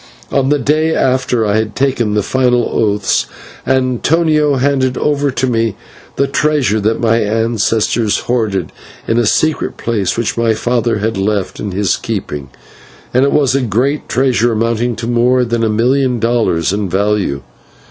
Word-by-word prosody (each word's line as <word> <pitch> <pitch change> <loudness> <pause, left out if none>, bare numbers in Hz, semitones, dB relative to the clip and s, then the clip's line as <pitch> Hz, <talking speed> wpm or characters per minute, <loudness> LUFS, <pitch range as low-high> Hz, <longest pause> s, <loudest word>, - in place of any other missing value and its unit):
On 135 -1 +1
the 145 - +3
day 155 +4 +1
after 130 -3 +1
I 105 0 +1
had 110 -1 -2
taken 125 -6 0
the 105 - +1
final 125 -1 +1
oaths, 105 -3 +1 0.4
Antonio 145 +4 +2
handed 130 -1 0
over 145 -1 0
to 130 0 -1
me 115 -4 0 0.4
the 140 - +1
treasure 140 -5 +1
that 110 +2 0
my 115 -1 +2
ancestors 110 0 0
hoarded 105 -8 -1 0.4
in 115 - +2
a 120 - +1
secret 155 +7 0
place, 105 -5 -1
which 115 0 -2
my 115 -1 +2
father 120 0 0
had 110 +1 -2
left 100 -1 -2
in 105 - -4
his 100 0 0
keeping, 70 -2 -5 0.6
and 130 - +3
it 140 - +1
was 140 -3 +2
a 135 - +1
great 125 +6 -1
treasure, 120 -2 +1
amounting 115 +2 0
to 115 - -5
more 120 +1 +2
than 115 0 -1
a 110 - +1
million 125 +3 +1
dollars 110 -8 +1
in 100 -2 -2
value. 95 -7 0
120 Hz, 160 wpm, -15 LUFS, 105-130 Hz, 0.6 s, the